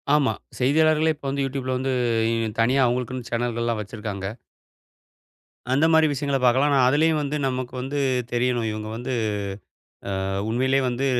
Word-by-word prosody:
ஆமா. 145 -3 +3 0.3
செய்தியாளர்களே 155 +4 +3
இப்போ 140 - -8
வந்து 140 0 -1
Youtubeல 130 -1 -3
வந்து 130 +1 -1 0.4
இ - - +1 0.3
தனியா 125 +4 +3
அவுங்களுக்குன்னு 125 0 -2
சேனல்கள்லா 120 0 -1
வச்சுருக்காங்க. 105 -2 -5 1.5
அந்த 140 +4 +3
மாரி 160 0 +6
விஷயங்கல 140 0 -1
பார்க்கலா, 130 +4 +4
ஆனா 140 - +3
அதிலேயும் 155 +3 +3
வந்து 145 +1 -2
நமக்கு 130 -1 -3
வந்து 135 +3 -4 0.3
தெரியணும். 120 -1 +1
இவுங்க 110 0 -5
வந்து 125 +3 -5 1.1
அ - - -2 0.2
உண்மையிலயே 130 +3 +2
வந்து 125 +3 -1
130 Hz, 140 wpm, -24 LUFS, 120-140 Hz, 1.5 s, மாரி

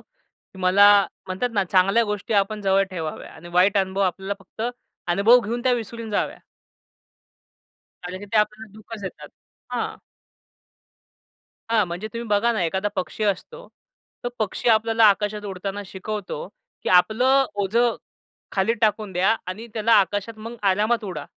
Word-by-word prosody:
की 190 - -23
मला 190 +2 +6 0.4
म्हणतात 190 +7 -2
ना, 200 -3 +1
चांगल्या 195 +5 +3
गोष्टी 210 0 -3
आपण 205 +1 +1
जवळ 195 0 +3
ठेवाव्यात 160 -4 -6
आणि 165 +2 -12
वाईट 185 +4 +4
अनुभव 190 0 -1
आपल्याला 190 +1 -1
फक्त 195 +3 -9 0.5
अनुभव 210 +7 +6
घेऊन 235 +2 -4
त्या 255 0 +3
विसरून 230 -1 -4
जाव्या. 205 - -1 1.6
कारण 180 +1 -6
की 205 - -9
ते - - +2
आपल्याला 215 0 -1
दुःखच 215 +1 -10
देतात. 190 - -7 0.4
हां. - - -2 1.7
हां, 220 -2 +4
म्हणजे 175 +5 -5
तुम्ही 235 0 -5
बघा 210 +3 +2
ना 215 -5 -1
एखादा 190 +5 -1
पक्षी 190 +3 -3
असतो, 210 - -3 0.6
तो - - 0
पक्षी 215 +2 -1
आपल्याला 225 0 +4
आकाशात 210 0 +3
उडताना 195 +1 -5
शिकवतो 195 -3 -5 0.4
की - - -2
आपलं 250 +9 +4
ओझं 225 +4 +1 0.6
खाली 195 +3 +2
टाकून 215 -2 +1
द्या 185 +5 +3
आणि 195 +6 -6
त्याला 225 +1 +1
आकाशात 205 +3 -3
मग 230 +2 -8
आरामात 210 +4 +2
उडा. 170 -7 -5
205 Hz, 145 wpm, -23 LUFS, 190-225 Hz, 1.7 s, मला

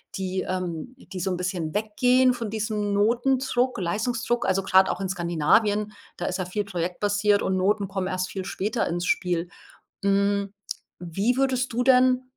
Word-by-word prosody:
die, 190 0 -2
ähm 185 +6 -4
die 195 -7 -9
so 190 - -1
'n 180 - -1
bisschen 180 -3 -3
weggehen 250 +4 +3
von 230 -3 -4
diesem 210 -1 -2
Notendruck, 245 +3 +1
Leistungsdruck. 230 +6 -1
Also, 190 0 +1
gerade 190 0 +4
auch - - -4
in 195 - -1
Skandinavien, 205 +5 +1 0.2
da 175 - -4
ist 185 - -2
ja 185 - -1
viel 205 +3 -3
projektbasiert 205 +3 0
und 190 - 0
Noten 200 +2 +1
kommen 190 -1 -3
erst 185 0 -2
viel 190 -1 -4
später 215 +5 -2
ins 175 +1 -2
Spiel. 175 -1 0 0.5
Hm, 200 0 +1 0.5
wie 195 +9 -1
würdest 260 -2 +1
du 245 +2 +1
denn, 255 0 +4
200 Hz, 165 wpm, -25 LUFS, 185-235 Hz, 0.5 s, gerade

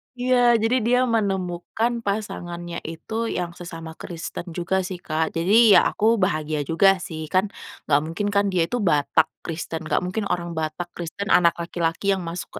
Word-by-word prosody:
Iya, 245 -1 +4
jadi 225 +3 +2
dia 250 +1 +3
menemukan 200 -1 -1
pasangannya 175 -4 -4
itu, 220 +8 -4
yang 175 -1 -2
sesama 165 -2 -8
Kristen 170 +1 -6
juga 185 +2 0
sih, 185 - -5
Kak. 160 +1 -1
Jadi 205 +5 +6
ya - - +9
aku 215 - -2 0.2
bahagia 155 -3 0
juga 195 +6 +4
sih 160 -2 -6
kan 185 +2 +4 0.4
enggak 145 0 +4
mungkin 175 +6 -3
kan 200 0 +4
dia 175 -2 +3
itu 245 - -1
Batak 160 -3 +2 0.2
Kristen, 165 0 -5
enggak - - +1
mungkin 200 +4 -2
orang 170 -1 -2
Batak 160 +3 -3
Kristen, 175 +4 -5
anak 170 -2 +5
laki-laki 170 +1 -2
yang 190 - -3
masuk 170 +1 -6
175 Hz, 165 wpm, -23 LUFS, 165-205 Hz, 0.4 s, ya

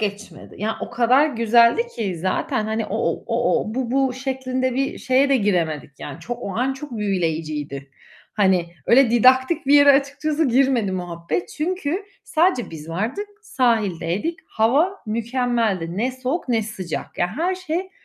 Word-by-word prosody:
geçmedi. 205 0 -5
Ya, 220 +2 -2
o - - -5
kadar 250 +5 +4
güzeldi 235 - +3
ki 195 -6 -2
zaten, 190 +4 -1
hani, 220 0 -2
o 210 - -3
o - - -1
o 240 +1 +1
o 215 - -5
bu 255 -2 -2
bu 265 0 +2
şeklinde 260 -1 -2
bir 270 +1 -1
şeye 260 +2 +2
de 275 - +4
giremedik 170 - 0
yani 145 -1 -8
çok, 240 0 -5
o 195 - -5
an 255 +3 +1
çok 270 -2 -8
büyüleyiciydi. 155 -8 -2 0.4
Hani, 190 -4 +2 0.2
öyle 250 0 +5
didaktik 260 +6 +4
bir 280 - +5
yere 285 -1 +8
açıkçası 285 +2 0
girmedi 245 -5 +2
muhabbet, 175 - -3
çünkü 360 +3 -2 0.2
sadece 325 -6 +1
biz 160 -1 -9
vardık, 225 - -3
sahildeydik, 220 - 0
hava 290 - +1
mükemmeldi. 225 -6 -1
Ne 240 +6 0
soğuk 260 +5 -3
ne 230 -2 +2
sıcak, 190 -6 -6
yani 175 0 +1
her 355 +4 0
şey 365 +1 -4
240 Hz, 155 wpm, -22 LUFS, 200-275 Hz, 0.4 s, yere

